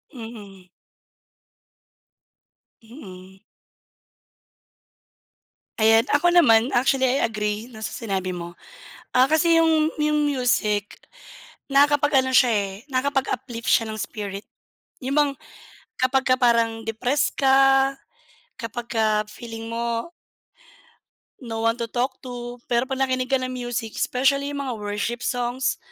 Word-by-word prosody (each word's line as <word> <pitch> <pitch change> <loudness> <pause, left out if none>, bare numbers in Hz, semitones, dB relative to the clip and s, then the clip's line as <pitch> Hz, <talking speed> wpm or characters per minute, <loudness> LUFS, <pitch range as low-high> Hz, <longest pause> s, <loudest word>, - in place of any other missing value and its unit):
Mm. 205 -6 -11 2.1
Mm. 190 -6 -13 2.4
Ayan, 225 +1 +5
ako 345 +5 +3
naman 230 -8 +6
actually 260 +1 +2
I 265 +3 +1
agree 210 +1 -2
na 220 - -11
sa 220 - -5
sinabi 190 -5 -3
mo. 175 0 -8 0.6
Ah, 255 - +7
kasi 320 +3 +3
yung, 320 -1 +3
yung 300 -1 +1
music 215 -6 0 0.7
nakakapag-ano 280 -2 +3
siya 250 -1 +6
eh, 200 -3 0 0.2
nakakapag-uplift 260 -3 -2
siya 225 - +3
ng 220 - -5
spirit. 200 -1 -5 0.6
Yung 275 +3 +1
mga 290 -1 +3 0.7
kapagka 255 0 +2
parang 230 -2 +2
depressed 245 +6 0
ka, 270 0 +4 0.6
kapagka 225 -2 -1
feeling 225 0 -8
mo 235 +4 -3 1.3
no 225 -3 -5
one 230 +1 +1
to 235 - -2
talk 255 +3 -2
to. 245 -1 -8
Pero 240 +2 0
'pag 265 - -2
nakinig 255 0 -2
ka 270 - +3
ng 255 0 -4
music, 240 -3 -4
specially 275 +2 +1
yung 285 -1 -4
mga 250 - -3
worship 210 +3 -4
songs, 245 +1 -1
245 Hz, 115 wpm, -23 LUFS, 225-270 Hz, 2.4 s, Ah